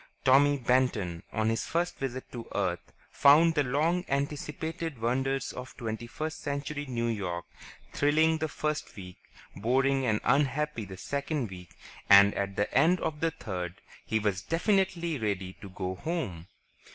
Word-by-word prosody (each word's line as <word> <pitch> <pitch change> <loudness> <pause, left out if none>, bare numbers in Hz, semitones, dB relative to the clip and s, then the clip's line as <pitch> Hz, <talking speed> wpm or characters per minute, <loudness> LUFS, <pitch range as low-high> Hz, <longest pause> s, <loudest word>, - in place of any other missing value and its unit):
Tommy 145 +2 +5
Benton, 120 -9 +1
on 110 0 0
his 115 0 -1
first 175 +1 -1
visit 130 -1 -3
to 120 -2 -7
Earth, 90 -3 -2 0.2
found 155 +4 +6
the 150 - +2
long 155 +7 +1
anticipated 150 +2 -3
wonders 135 +3 0
of 125 +1 -9
twenty 115 -2 -4
first 155 +6 -5
century 145 0 -3
New 120 -2 -2
York 95 -7 -2 0.5
thrilling 155 +2 +3
the 160 - 0
first 150 0 -3
week, 90 -2 -10 0.4
boring 130 +5 +2
and 105 -2 +2
unhappy 145 -1 +1
the 95 -1 -9
second 140 - -3
week, 90 -2 -11 0.3
and 100 +1 +8
at 100 0 -2
the 105 - -1
end 180 +3 +5
of 150 -1 -3
the 165 - +2
third 90 - -5 0.3
he 110 - 0
was 105 -4 0
definitely 170 - 0
ready 95 -4 -2
to 100 - -8
go 95 0 -4
home. 95 - -4
130 Hz, 150 wpm, -29 LUFS, 100-150 Hz, 0.5 s, and